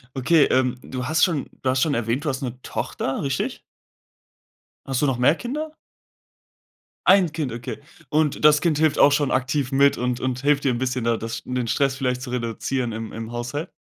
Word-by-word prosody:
Okay, 145 +4 +4
ähm, 130 -1 +1
du 130 -1 -5
hast 160 +2 +2
schon 165 -7 +1
du 130 - 0
hast 130 0 +1
schon 155 - +2
erwähnt, 120 +4 -1
du 150 - +1
hast 135 +1 -3
'ne 125 -1 -5
Tochter, 135 - -3
richtig? 135 -1 -2 1.3
Hast 135 0 -1
du - - +3
noch 135 -4 +1
mehr 130 +6 +4
Kinder? 300 - -4 1.4
Ein 185 -4 +6
Kind, 150 -7 -3
okay. 120 +4 -6 0.3
Und 150 -1 +1
das 150 0 +7
Kind 155 -3 +1
hilft 155 -2 +2
auch 145 - +6
schon 145 -2 +1
aktiv 135 +1 0
mit 140 +1 +4
und 125 0 -1
und 130 -1 -2
hilft 145 0 +2
dir 135 - +3
'n - - -2
bisschen, 130 -1 -2
da 115 -1 +2
das 115 +1 -5
sch - - -10
den 125 -2 -2
Stress 135 +1 +1
vielleicht 125 -2 -1
zu 125 -2 -6
reduzieren 120 +1 -2
im 110 0 -6
im 115 +1 -6
Haushalt? 120 +8 -4
130 Hz, 205 wpm, -23 LUFS, 125-150 Hz, 1.4 s, das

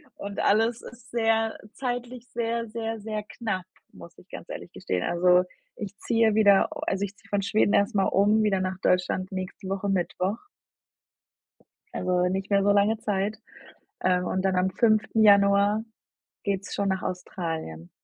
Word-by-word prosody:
Und 200 0 -6
alles 225 +3 +2
ist 245 -1 -13
sehr 225 -1 +1 0.2
zeitlich 245 -1 -5
sehr, 230 0 -2
sehr, 225 0 -4
sehr 215 0 -4
knapp, 205 -4 -4 0.3
muss - - -13
ich - - -19
ganz - - -9
ehrlich - - -8
gestehen. 90 -1 -2
Also, 180 +1 +4 0.3
ich 205 -1 -7
ziehe 225 -1 +2
wieder 205 -3 +5
u - - -7
also 195 +1 -1
ich 200 +1 -10
ziehe - - -23
von 205 -1 0
Schweden 205 +1 +2
erst 200 +3 +2
mal 195 - +3
um, 210 +3 +3
wieder 200 -3 +2
nach 185 0 -2
Deutschland 180 +1 +1
nächste 185 +1 -6
Woche 195 +1 -2
Mittwoch. 190 +2 -1 1.5
Also, 180 0 +1
nicht 190 +1 -3
mehr 200 -1 +4
so 205 - +4
lange 205 +2 +3
Zeit, 205 0 -2 0.6
ähm, 180 -1 +2
und 185 +1 -1
dann 190 -1 +1
am 185 +1 +2
5. 220 +1 +2
Januar 200 +1 +5 0.6
geht's 200 -1 -2
schon 200 -1 0
nach 190 -1 -1
Australien. 160 - -5
200 Hz, 165 wpm, -26 LUFS, 185-220 Hz, 1.5 s, wieder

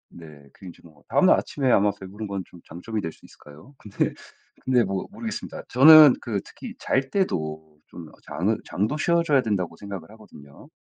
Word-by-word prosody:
네. 75 -4 -15
그 - - -16
인제 90 - -12
뭐 75 -3 -19
다음날 - - +4
아침에 135 -3 -1
아마 100 -1 +3
배부른 100 +3 -8
건 100 -1 -4
좀 90 - -17
장점이 105 +6 -6
될 80 - -5
수 - - -21
있을까요? 75 - -17
근데 105 -5 -3 0.5
근데 125 -2 +2
뭐 95 -2 -4
모르겠습니다. 220 +1 -7
저는 150 +2 +8
그 110 -5 -3
특히 - - -10
잘 135 0 -1
때도 80 - -3
좀 80 -3 -11
장은 95 +9 -2
장도 110 +11 -2
쉬어 170 +2 +1
줘야 145 -5 +2
된다고 95 -8 -3
생각을 100 -3 -9
하거든요. 75 -10 -16
100 Hz, 360 characters per minute, -24 LUFS, 85-130 Hz, 0.5 s, 저는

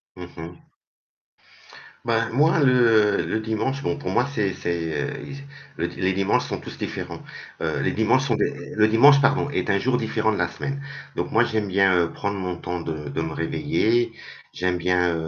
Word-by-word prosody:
Mmh 90 -2 -10
mh. 85 +1 -10 1.4
Ben 115 -1 +1
moi 155 +6 +3
le 115 -6 +4
le 110 - -1
dimanche 110 +5 -2
bon 145 - -1
pour 145 - -5
moi 120 +2 +2
c'est 100 -6 0
c'est, 85 -2 -2 0.7
le 85 - -1
les 95 +2 -1
dimanches 95 0 +1
sont - - -4
tous - - -9
différents, - - -5 0.4
heu, - - -1
les - - +1
dimanches 115 +4 +2
sont 120 -5 +1
des 145 0 -3
le 105 0 +5
dimanche 140 +6 +7
pardon 140 +1 +2
est - - -2
un 100 -1 +3
jour 125 +3 +1
différent 110 -1 0
de 105 - -2
la 90 - +1
semaine, 140 +10 -5 0.4
donc - - -2
moi 115 - +4
j'aime 110 -3 -1
bien, 95 0 +3
heu, 85 -1 +1
prendre 100 0 -3
mon 90 -1 -3
temps 90 +1 -4
de 80 -3 -5
de 70 - -3
me 80 -1 -3
réveiller, 115 +8 0 0.4
j'aime 90 -1 -1
bien 90 0 +1
110 Hz, 185 wpm, -23 LUFS, 90-120 Hz, 1.4 s, dimanche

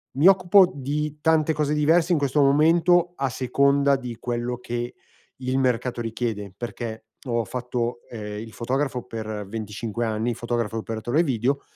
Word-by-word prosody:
Mi 145 +7 +5
occupo 190 0 +6
di 150 +2 -3
tante 160 -1 +3
cose 150 -1 0
diverse 160 +4 +3
in 170 - +4
questo 145 0 +1
momento 165 +5 +4
a 135 0 0
seconda 140 +3 +2
di 125 -3 -7
quello 120 +1 -3
che 120 0 -4 0.5
il 130 +1 0
mercato 125 -1 0
richiede, 110 -3 -3
perché 115 -1 -6 0.2
ho 120 -1 0
fatto, 120 +1 -3
ehm, 105 -3 -6
il 110 +1 -8
fotografo 130 +1 -2
per 110 -2 -5
25 110 +2 -4
anni, 110 +2 -1
fotografo 115 -1 -2
e - - -1
operatore 115 +7 -1
video, 135 -1 0
125 Hz, 155 wpm, -24 LUFS, 115-145 Hz, 0.5 s, occupo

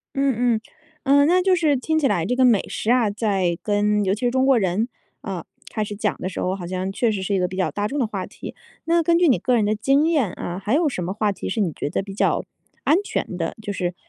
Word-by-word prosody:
嗯 275 -2 +2 0.2
嗯。 - - -4 0.4
呃， 285 +1 +5
那 360 +3 +4
就 375 -1 +3
是 310 -4 +2
听 315 +5 0
起 290 - +2
来 175 -8 +1
这 250 +5 0
个 260 - +4
美 230 -6 +5
食 220 - -2
啊 240 -4 +3
在 195 -5 0
跟 210 0 +1
尤 190 - +1
其 210 - -9
是 245 -1 +1
中 260 +1 +2
国 270 -3 +5
人， 200 +3 0 0.3
呃， - - -5 0.3
开 215 - -1
始 205 0 -6
讲 210 0 -1
的 185 - -2
时 185 - -5
候， 185 +1 0
好 180 -3 -6
像 185 +1 -3
确 230 +2 +1
实 195 -3 -2
是 200 +1 -1
一 - - +2
个 180 -1 +1
比 185 - -7
较 185 - 0
大 205 0 -2
众 285 +4 -3
的 245 - +2
话 195 -4 -4
题。 - - -9 0.3
那 335 +1 +3
根 335 +1 +3
据 350 -3 +4
你 255 - +4
个 250 -2 +1
人 220 - +3
的 210 +1 +1
经 275 +8 +2
验 290 - +2
啊， 175 +1 -5
还 215 +6 0
有 320 0 +3
什 215 -10 -3
么 180 +2 -2
话 210 -1 0
题 - - -6
是 220 - -2
你 175 -6 +1
觉 - - -4
得 155 - -2
比 195 0 -8
较 - - +1 0.4
安 310 - +4
全 185 - -3
的？ 165 -1 -2
就 205 - -4
是， 180 -2 -2
215 Hz, 300 characters per minute, -22 LUFS, 190-270 Hz, 0.4 s, 呃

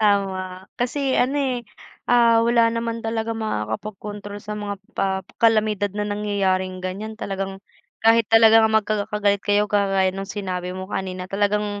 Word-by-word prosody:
Tama, 190 -2 0
kasi 265 +2 0
ano, 275 +3 +2
eh, 250 -3 -1 0.4
ah, 230 -1 +4
wala 235 -1 +4
naman 230 0 -2
talagang 225 0 -3
makakapag-kontrol 205 - -4
sa 210 - -5
mga 205 -1 -4 0.2
pa 190 -1 -1 0.2
kalamidad 215 -3 +3
na 210 - -1
nangyayaring 190 -3 -1
ganyan. 215 +4 -5
Talagang 195 -2 -5 0.4
kahit 225 -1 +5
talaga 225 0 +7
magkaka-galit 210 -1 +1
kayo, 205 0 +2
kagaya 195 -2 +1
nung 195 +1 -6
sinabi 185 -3 -4
mo 185 - -5
kanina, 185 -1 -3
talagang 205 +1 -1
205 Hz, 135 wpm, -22 LUFS, 195-225 Hz, 0.4 s, talaga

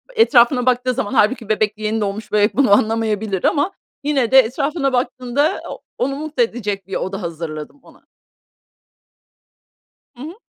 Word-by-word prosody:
etrafına 250 - +4
baktığı 255 0 +1
zaman 205 -3 -3
hâlbuki 225 0 +1
bebek, 215 -1 0
yeni 215 +1 -2
doğmuş 205 +1 -4
bebek 210 +1 +2
bunu 275 -6 +3
anlamayabilir 215 -2 0
ama 300 +6 +1 0.3
yine 275 -5 0
de 265 - +8
etrafına 275 +3 0
baktığında, 255 +5 0
o - - -8 0.2
onu 275 +2 -1
mutlu 295 -3 -1
edecek 205 -5 -4
bir 195 - -5
oda 195 +2 -3
hazırladım 165 - -6
ona. - - -20 2.1
Hı 245 - -10
hı. 315 +4 -7
235 Hz, 145 wpm, -19 LUFS, 210-270 Hz, 2.1 s, de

